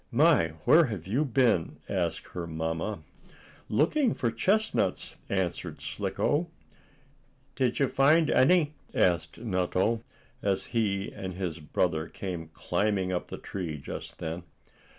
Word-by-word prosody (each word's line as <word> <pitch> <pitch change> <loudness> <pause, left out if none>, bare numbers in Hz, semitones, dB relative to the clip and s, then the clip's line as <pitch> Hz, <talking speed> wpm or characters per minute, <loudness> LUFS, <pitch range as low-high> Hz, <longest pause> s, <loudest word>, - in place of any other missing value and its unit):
"My! 130 - +4
Where 165 +1 +7
have 105 - -5
you 120 +10 +1
been?" 120 - +2
asked - - -2
her 85 -2 -5
mamma. 80 +3 -3 0.7
"Looking 220 - +2
for 120 - 0
chestnuts," 200 - +1
answered 95 -4 -2
Slicko. 165 +4 -1 1.1
"Did 125 -2 +1
you 140 - +3
find 150 +5 +4
any?" 155 +1 +4 0.2
asked 90 -2 +2
Nutto, 100 +1 0 0.4
as 95 -1 0
he 100 -4 0
and 95 -2 -6
his 90 -3 -3
brother 80 +1 0
came 90 -4 -5
climbing 95 +3 -1
up 90 - -2
the - - -6
tree 85 -6 -5
just 70 - -7
then. 80 +2 -4
100 Hz, 125 wpm, -29 LUFS, 85-135 Hz, 1.1 s, Where